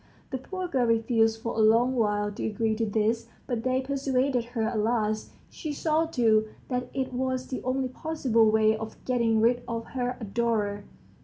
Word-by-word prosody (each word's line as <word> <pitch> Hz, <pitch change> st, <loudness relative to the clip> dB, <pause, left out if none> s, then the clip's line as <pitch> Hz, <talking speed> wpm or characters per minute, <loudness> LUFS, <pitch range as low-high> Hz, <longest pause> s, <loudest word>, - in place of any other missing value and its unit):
The 260 Hz, -, -2 dB
poor 370 Hz, +7 st, -5 dB
girl 260 Hz, -7 st, +1 dB
refused 225 Hz, -1 st, +2 dB
for 230 Hz, -, -2 dB
a -, -, -1 dB
long 230 Hz, +4 st, +4 dB
while 210 Hz, -3 st, +1 dB
to 205 Hz, -, -6 dB
agree 220 Hz, +1 st, 0 dB
to 225 Hz, 0 st, -1 dB
this, 220 Hz, +2 st, 0 dB, 0.2 s
but 240 Hz, -3 st, -2 dB
they 255 Hz, +2 st, +1 dB
persuaded 265 Hz, -2 st, 0 dB
her 235 Hz, -2 st, -3 dB
at 220 Hz, 0 st, 0 dB
last; 215 Hz, -1 st, 0 dB
she 310 Hz, -, -6 dB
saw, 315 Hz, +2 st, +1 dB
too, 220 Hz, -7 st, +3 dB, 0.2 s
that 250 Hz, -1 st, -2 dB
it 265 Hz, -1 st, -3 dB
was 255 Hz, 0 st, -1 dB
the 255 Hz, -, -5 dB
only 260 Hz, +1 st, -1 dB
possible 255 Hz, -6 st, +1 dB
way 220 Hz, 0 st, +4 dB
of 220 Hz, 0 st, -7 dB
getting 230 Hz, -3 st, +2 dB
rid 240 Hz, +2 st, +3 dB
of 230 Hz, -1 st, -3 dB
her 250 Hz, -1 st, -2 dB
adorer. 210 Hz, -2 st, -1 dB
235 Hz, 180 wpm, -27 LUFS, 220-255 Hz, 0.2 s, long